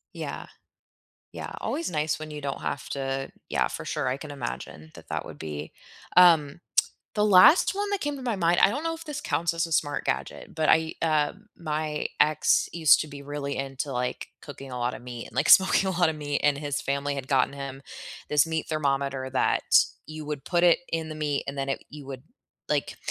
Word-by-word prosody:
Yeah. - - -6 0.8
Yeah, - - -7
always 335 - -2
nice 155 -1 0
when 155 0 -7
you 150 - -7
don't 140 -1 -4
have 140 - -4
to 135 0 -3 0.2
Yeah, - - +1
for - - -7
sure, - - -2
I 130 +2 0
can 145 0 -8
imagine 120 - -6
that - - -14
that - - -3
would - - -10
be 75 -1 -6 0.5
um, 165 -3 +6 0.6
the 210 -1 +2
last 205 - +7
one 410 +1 -2
that 405 - -1
came 290 0 -2
to 270 - -8
my 240 -4 -1
mind, 175 -1 +2
I - - +7
don't 285 +8 -3
know 330 0 -1
if 330 - -10
this 300 -2 -5
counts 170 0 0
as 165 0 0
a 165 - -8
smart 145 -1 0
gadget, - - -3
but 155 -1 0
I, 160 0 +3
uh 155 -2 +2 0.2
my 155 -2 -2
ex 155 0 +3
used 160 -4 +6
to 155 - -4
be 140 -1 -9
really 140 0 -4
into, 135 +1 -4
like, 125 0 -3
cooking 135 -2 -10
a 125 - -5
lot 120 +1 -1
of - - -9
meat 120 -1 -7
and, - - -17
like, 140 +5 +1
smoking 190 0 +6
a 190 - 0
lot 175 -3 +4
of - - -4
meat, 145 -1 -2
and 145 -1 +3
his 145 -1 -2
family 140 +1 -1
had 135 -1 -5
gotten 135 0 +2
him 140 -1 -7 0.5
this 150 0 +4
meat 160 -1 -3
thermometer 140 -3 -1
that 130 - +1 0.4
you 155 0 -7
would 150 -2 -5
put 175 -1 +1
it 175 -1 +5
in 165 -1 -1
the 155 - -6
meat, 150 -2 -1
and 140 - -4
then 135 0 -2
it - - -2
you 145 -2 -10
would 130 -2 -7 0.5
like, - - -1
150 Hz, 220 wpm, -26 LUFS, 135-165 Hz, 0.8 s, last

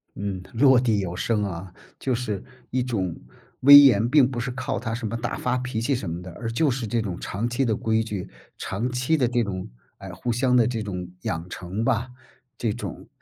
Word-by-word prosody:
嗯， 100 -2 -4
落 130 +1 +6
地 115 -4 +1
有 90 -3 -3
声 105 +2 0
啊， 95 -1 -5 0.3
就 130 - -1
是 115 -5 -3 0.3
一 130 0 0
种 95 -9 -2 0.5
威 145 +2 +11
严 120 -6 +6
并 135 -2 +5
不 125 -3 -4
是 125 +2 -2
靠 125 - -3
他 115 -1 -4
什 115 -1 -3
么 115 - -3
大 120 +1 -3
发 125 0 0
脾 125 -3 -3
气 135 +4 +1
什 115 -6 -4
么 85 +2 -5
的， 90 0 -9
而 115 -1 -3
就 145 +6 +2
是 125 -2 -2
这 115 +2 0
种 95 -5 -4
长 115 +5 -3
期 130 +3 0
的 110 -3 +1
规 110 +1 +1
矩， 105 -4 -5 0.3
长 115 +6 -3
期 125 +6 +1
的 130 -4 +2
这 120 0 +1
种， 95 -3 -4 0.3
哎， - - -9
互 120 - -3
相 125 +2 +2
的 120 -3 +5
这 115 -3 -2
种 90 -4 -5
养 85 +2 -3
成 90 +6 -4
吧， 120 0 0 0.5
这 115 - 0
种 - - -7
115 Hz, 235 characters per minute, -24 LUFS, 100-125 Hz, 0.5 s, 威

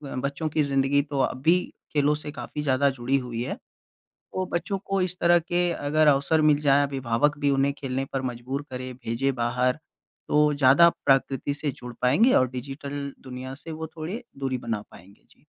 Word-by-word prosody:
बच्चों 140 +4 -2
की 150 0 +1
ज़िंदगी 140 0 +2
तो 140 -1 -4
अब 130 0 0
भी 170 +5 +4 0.3
खेलों 145 0 +3
से 150 0 -7
काफ़ी 145 +2 -6
ज़्यादा 140 0 +3
जुड़ी 130 +1 0
हुई 120 -3 -4
है। - - -3 0.6
तो 185 0 -6
बच्चों 195 +4 -1
को 195 -1 0
इस 180 0 -1
तरह 175 0 +5
के 175 +1 0
अगर 155 0 +1
अवसर 145 +3 +3
मिल 150 -1 +4
जाएँ, 145 0 +4
अभिभावक 135 +1 0
भी 145 -1 +2
उन्हें 140 +1 +2
खेलने 135 0 -3
पर 135 - 0
मजबूर 130 +4 -5
करें, 130 0 -5
भेजें 130 +2 -1
बाहर, 125 +3 0 0.5
तो 150 0 +3
ज़्यादा 140 +4 +6 0.2
प्रकृति 135 +1 +2
से 145 0 -3
जुड़ 125 -2 -10
पाएँगे 170 - +4
और 130 - +4
डिजिटल 140 +2 -6
दुनिया 130 0 -7
से 160 +3 -10
वो 160 0 -5
थोड़े 190 +11 -5 0.2
दूरी 135 -2 -1
बना 115 -3 -3
पाएँगे। 95 +3 -17
जी। - - -24
140 Hz, 185 wpm, -25 LUFS, 130-150 Hz, 0.6 s, ज़्यादा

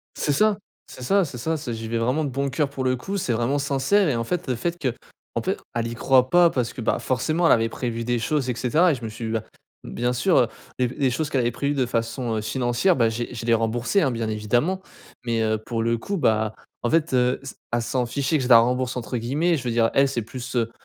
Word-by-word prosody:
C'est 145 - 0
çà, 210 +6 +3 0.3
c'est 130 - -11
ça, 195 +8 +3
c'est 130 -5 -7
ça. 160 +7 -1
C'est 140 -6 -5
j'y 110 0 -6
vais 115 0 -1
vraiment 130 +7 0
de 140 - -2
bon 140 +1 -1
coeur 145 +1 0
pour 135 -2 -4
le 130 0 +2
coup. 195 +11 -4
C'est 130 -10 -1
vraiment 120 +5 0
sincère 140 +8 +2
et 125 - +1
en 115 - -1
fait 180 +5 -2
le 125 - +1
fait 175 +7 -2
que, 130 -6 -1 0.4
en - - -1
fait, - - -1 0.2
elle 115 -1 -1
y 115 - -5
croit 130 +1 +3
pas 175 +2 +5
parce 120 -3 -1
que, - - -7
bah, - - +1
forcément 155 +6 0
elle - - +6
avait 115 0 +3
prévu 115 -1 -4
des 120 0 0
choses 135 0 0
et - - -1
cetera 155 +9 +3
et - - +1
je 120 -3 -8
me - - -3
suis 115 +1 -6
dit: 110 - -3
«Bah, 110 - +1 0.4
bien 120 +1 -1
sûr, 170 +9 +2
heu, 120 - +3 0.3
les 125 -1 +2
les 130 +1 0
choses 145 +4 -2
qu'elle 135 - +1
avait 120 0 +1
prévues 140 +4 -1
de 130 -3 +1
façon, 115 0 -2
heu, - - 0
financière» 120 - +1
bah, 115 -3 +3
j'ai 120 +2 -4
je 115 0 -6
l'ai 115 - +4
remboursée, 120 - +1
hein, 135 - +2
bien 115 -2 -2
évidemment 120 - 0 0.4
mais, 115 -1 0
heu, 110 0 +1
pour 115 +1 -3
le 115 0 +1
coup, 195 - -3
bah, 110 -4 +1 0.3
en 120 - 0
fait, 160 -4 +2
heu, 125 +1 +2
s 135 - -9 0.2
elle 120 -1 +1
s'en 125 +1 -1
fichait 140 +5 0
que 130 - -2
je - - -2
la 115 -2 +9
«rembourse» 125 +2 +1
entre 125 +1 -3
guillemets 150 +9 +1
je 130 - -6
veux 120 - -1
dire 115 -1 +2
elle 135 0 +4
c'est 120 -4 -2
plus, 125 +2 -7
heu, 115 -1 +1
125 Hz, 275 wpm, -24 LUFS, 115-140 Hz, 0.4 s, la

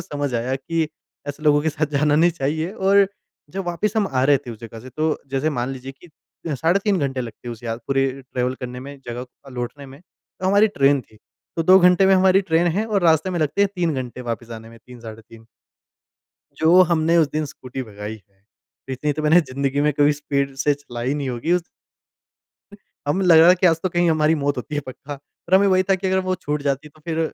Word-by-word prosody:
समझ 145 -2 -4
आया 120 +3 -1
कि 160 +4 -2 0.4
ऐसे 145 +1 -6
लोगों 145 -1 +4
के 160 - +1
साथ 155 0 -1
जाना 150 0 +2
नहीं 170 +3 +4
चाहिए। 160 +2 -2
और 200 -1 +3 0.4
जब 195 +3 -4
वापस 175 +4 -1
हम 210 - +2
आ 130 -1 0
रहे 145 0 +5
थे - - -5
उस 110 - -9
जगह 115 -1 -9
से 130 - -11
तो, 155 +2 -1
जैसे 135 +3 0
मान 125 -2 -2
लीजिए 130 +1 -8
कि 175 - -15 0.5
साढ़े 165 +8 +2
3 200 -3 +2
घंटे 135 -3 -2
लगते 120 0 -8
है, - - -3
उस 115 0 -12
यात 115 0 -4
पूरे 135 -1 +1
ट्रेवल 125 -1 -2
करने 125 0 -6
में 140 +1 -9
जगह 120 +1 -5 0.2
अ, - - -11
लौटने 125 +3 -6
में। 135 +2 -13 0.4
तो 185 - -1
हमारी 205 +3 +4
ट्रेन 140 -7 +2
थी। 110 -3 -21 0.4
तो 165 - +1
2 185 +3 +7
घंटे 180 +1 +5
में 195 - +5
हमारी 190 0 +4
ट्रेन 165 +2 +3
है, 190 +6 0
और 205 -4 0
रास्ते 160 +1 +3
में 175 - -2
लगते 155 +6 0
हैं 200 - +3
3 170 -3 0
घंटे 125 -1 -5
वापस 120 0 -5
आने 110 0 -9
में 115 0 -15
3 125 -1 -13
साढ़े 115 -1 -10
3 115 0 -17 1.1
जो 170 +3 +5
हमने 165 0 +2
उसे 160 -4 +3
दिन 155 0 -1
स्कूटी 130 -2 -8
भगाई 105 -1 -8
है। 95 0 -36 0.5
इतनी 145 +3 -1
तो 155 +2 -5
मैंने 160 +3 +5
ज़िंदगी 140 -1 -2
में 150 +1 +2
कभी 145 +1 +3
स्पीड 140 -1 -2
से 145 -1 +3
चलाई 125 -2 -4
नहीं 145 -2 -3
होगी 125 +7 -2
उस 180 -1 +2 1.5
हम 185 +6 +1
लग 170 -3 +6
रहा 165 +2 +7
है 180 - +8
कि - - +5
आज 165 -2 +3
तो 185 - +1
कहीं 175 -1 +1
हमारी 155 0 +3
मौत 145 -1 -1
होती 130 +4 -5
है 145 - 0
पक्का। 145 +3 -8 0.3
पर 185 - +2
हमें 195 +1 +5
वही 185 -1 +4
था - - +6
कि 190 +1 -3
अगर 190 0 +2
वो 185 - +2
छूट 150 -3 -4
जाती 140 +1 -2
तो 155 +1 -23
फिर 165 -1 -2
145 Hz, 235 wpm, -21 LUFS, 130-170 Hz, 1.5 s, है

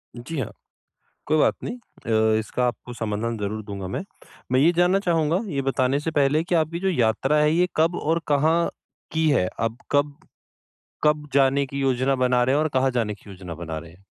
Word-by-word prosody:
जी 125 +7 -6
हाँ। 130 - -3 0.7
कोई 155 - +2
बात 150 - +3
नहीं। 245 - -4
अ, 110 - 0
इसका 115 +3 -1
आपको 120 +1 -5
समाधान 115 0 -2
ज़रूर 105 +1 -3
दूँगा 100 -3 -6
मैं। 95 - -4 0.5
मैं 130 - +4
ये 160 +5 +5
जानना 180 +2 +4
चाहूँगा, 165 -3 +1
ये 140 - 0
बताने 135 0 +1
से 160 +2 -3
पहले 150 +1 +2
कि 175 +1 0
आपकी 165 +1 0
जो 190 +1 0
यात्रा 135 -1 +2
है 150 0 +4
ये 175 +3 +3
कब 165 +2 +3
और 165 +2 +1
कहाँ 160 +4 +2 0.4
की 160 0 +1
है? 125 -11 +2
अब 115 0 -1
कब, 145 0 +1 0.9
कब 150 0 +2
जाने 140 0 +3
की 140 +1 -5
योजना 135 0 +1
बना 125 -1 +2
रहे 130 +2 +2
हैं? - - +2
और 155 - +1
कहाँ 130 0 +3
जाने 115 -4 -1
की 100 - -16
योजना 90 -3 -8
बना 80 -1 -5
रहे 85 +1 -11
हैं? 95 +3 -22
135 Hz, 205 wpm, -24 LUFS, 115-155 Hz, 0.9 s, ये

